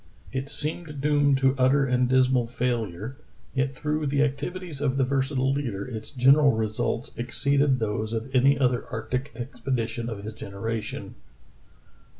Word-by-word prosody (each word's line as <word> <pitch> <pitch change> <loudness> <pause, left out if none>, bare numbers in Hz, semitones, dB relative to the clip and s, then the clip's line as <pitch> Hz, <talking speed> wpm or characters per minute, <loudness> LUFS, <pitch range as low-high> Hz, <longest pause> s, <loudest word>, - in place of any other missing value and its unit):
It 135 +1 -3
seemed 150 0 -3
doomed 145 -1 +3
to 135 0 +3
utter 135 +2 +4
and 125 -1 +2
dismal 130 -2 +3
failure, 120 -2 -2 0.4
yet 135 0 0
through 150 +2 -1
the 140 +1 +2
activities 150 +2 -3
of 135 -2 +1
the 135 - +3
versatile 135 0 +1
leader 120 -9 -3
its 110 -3 -6
gen 130 0 +5
eral 140 -5 +4
results 110 +1 -2
exceeded 140 +3 +2
those 110 -1 -2
of 115 +3 -4
any 135 +2 +5
other 125 -3 +2
arctic 125 +4 -3
expedi 125 -1 -2
tion 120 0 -4
of 100 -3 -6
his 110 +1 -5
generation. 110 +1 -5
130 Hz, 155 wpm, -26 LUFS, 115-140 Hz, 0.4 s, gen